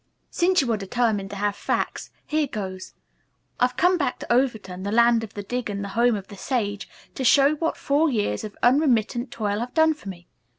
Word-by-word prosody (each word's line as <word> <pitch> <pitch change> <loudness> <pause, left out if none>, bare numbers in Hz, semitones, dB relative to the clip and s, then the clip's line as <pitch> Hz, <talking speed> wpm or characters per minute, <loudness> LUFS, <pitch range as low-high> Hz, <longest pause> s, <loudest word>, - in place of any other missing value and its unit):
"Since 365 0 +3
you 250 -4 -1
are - - 0
determined 205 0 -1
to 200 - -7
have 205 0 -1
facts, - - -2 0.2
here 305 -1 0
goes. 190 -5 -6 0.6
I've 250 0 +1
come 360 +4 +3
back 270 -4 -1
to - - -2
Overton, 220 -8 0
the 200 +1 -3
land 235 0 +4
of 215 - -9
the 205 - -5
dig 245 +2 -3
and 200 0 -3
the 200 - -5
home 235 +3 +2
of 195 -2 -6
the 200 - -11
sage, 205 -4 -2 0.2
to 265 - -4
show 275 +4 +5
what 325 +2 -1
four 295 +3 +2
years 205 - -1
of 210 - -8
unremittent 245 -2 +2
toil 210 -3 -2
have 240 +2 -5
done 320 0 +5
for 295 -10 -10
me. 175 -2 -10
235 Hz, 210 wpm, -24 LUFS, 205-270 Hz, 0.6 s, show